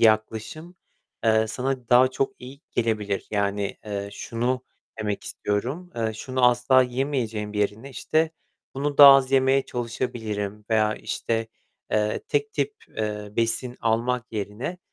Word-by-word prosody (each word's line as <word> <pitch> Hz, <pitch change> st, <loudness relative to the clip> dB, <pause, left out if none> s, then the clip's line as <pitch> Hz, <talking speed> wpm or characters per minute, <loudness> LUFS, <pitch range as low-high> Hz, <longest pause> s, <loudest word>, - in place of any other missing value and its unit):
yaklaşım, 110 Hz, +10 st, +1 dB, 0.5 s
eee, 110 Hz, 0 st, +4 dB
sana 125 Hz, +1 st, -3 dB
daha 125 Hz, +1 st, +6 dB
çok 135 Hz, +1 st, -1 dB
iyi 130 Hz, +3 st, -10 dB
gelebilir. 105 Hz, -4 st, -1 dB
Yani, 100 Hz, -1 st, -1 dB
eee, 100 Hz, -1 st, -3 dB
şunu 125 Hz, +4 st, -2 dB, 0.4 s
demek 105 Hz, -2 st, -2 dB
istiyorum. 130 Hz, -, -3 dB
Eee, 110 Hz, -1 st, 0 dB
şunu 130 Hz, +3 st, -1 dB
asla 125 Hz, +2 st, +4 dB
yemeyeceğim 125 Hz, -5 st, -2 dB
yerine 105 Hz, +5 st, -1 dB
işte 155 Hz, +4 st, 0 dB, 0.4 s
bunu 145 Hz, +1 st, -2 dB
daha 140 Hz, -1 st, +12 dB
az 135 Hz, -1 st, +2 dB
yemeye 135 Hz, 0 st, +4 dB
çalışabilirim 110 Hz, -4 st, -4 dB
veya 110 Hz, -1 st, +3 dB
işte, 115 Hz, -1 st, -2 dB, 0.5 s
eee, 105 Hz, 0 st, +1 dB
tek 435 Hz, 0 st, 0 dB
tip, 425 Hz, 0 st, -1 dB, 0.2 s
eee, 105 Hz, -1 st, -3 dB
besin 115 Hz, +2 st, 0 dB
almak 120 Hz, +2 st, 0 dB
yerine 110 Hz, -, -4 dB
115 Hz, 130 wpm, -25 LUFS, 105-130 Hz, 0.5 s, daha